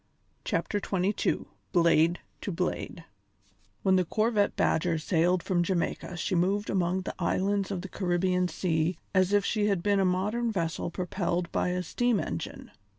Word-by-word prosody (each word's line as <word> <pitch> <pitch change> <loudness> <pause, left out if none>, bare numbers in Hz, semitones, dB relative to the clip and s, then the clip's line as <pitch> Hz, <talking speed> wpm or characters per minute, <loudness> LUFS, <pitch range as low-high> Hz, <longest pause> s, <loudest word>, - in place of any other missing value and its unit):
CHAPTER 205 - -1
XXII 195 +2 0 0.3
BLADE 170 0 +4 0.2
TO 200 - -3
BLADE 175 -1 -3 0.8
When 190 -1 +4
the 185 - +2
corvette 215 +2 +1
Badger 165 +1 +1
sailed 170 +2 +1
from 180 -3 +1
Jamaica 175 0 -2
she 185 - -2
moved 195 +4 +1
among 185 0 +1
the 185 - -5
islands 195 +2 0
of 190 -3 -3
the - - -5
Caribbean 180 -1 0
Sea 165 0 0 0.2
as 185 0 +3
if 205 -1 +3
she 210 -1 +1
had 195 -4 0
been 205 -1 +3
a - - +3
modern 210 +6 0
vessel 170 -4 -2
propelled 175 -1 -2
by - - 0
a 180 0 -1
steam 240 +4 +1
engine. 85 - -5
185 Hz, 155 wpm, -28 LUFS, 175-200 Hz, 0.8 s, BLADE